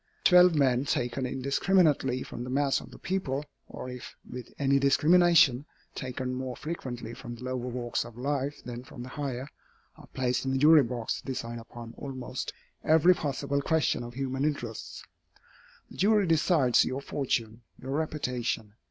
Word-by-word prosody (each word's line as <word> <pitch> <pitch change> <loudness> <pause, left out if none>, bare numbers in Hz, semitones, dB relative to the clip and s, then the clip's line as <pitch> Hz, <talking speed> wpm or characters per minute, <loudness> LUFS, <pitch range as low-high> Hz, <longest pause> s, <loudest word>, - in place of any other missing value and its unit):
Twelve 180 -2 +7
men, 135 -2 +3
taken 125 0 -1
indiscriminately 135 0 +2
from 120 - -7
the 125 - -6
mass 140 +1 +1
of - - -12
the - - -12
people, 150 -7 -2 0.2
or - - -8
if 125 -1 -8
with 125 0 -8
any 140 0 +3
discrimination, 155 -1 +5 0.3
taken 130 -1 -4
more 130 -1 -4
frequently 125 -8 -6
from 120 -1 -8
the 120 - -11
lower 130 -1 -3
walks 120 -1 -2
of 120 -1 -12
life 140 +2 -2
than 120 0 -7
from 120 -1 -10
the 130 - -8
higher, 135 -2 -4 0.5
are - - -14
placed 125 -1 -1
in 135 0 -1
a - - +1
jury 150 +2 +7
box 120 -2 -3
to - - -15
decide 120 -3 -4
upon 115 0 -10
almost 130 -2 -5 0.3
every 160 +3 +6
possible 140 -3 -2
question 160 -3 +1
of 120 0 -9
human 135 0 -2
interests. 125 -7 -3 0.9
The - - -12
jury 210 +1 +4
decides 160 -6 +4
your 130 +2 -3
fortune, 120 -5 -2 0.2
your 130 - -6
reputation. 125 -8 -2
130 Hz, 160 wpm, -29 LUFS, 125-145 Hz, 0.9 s, Twelve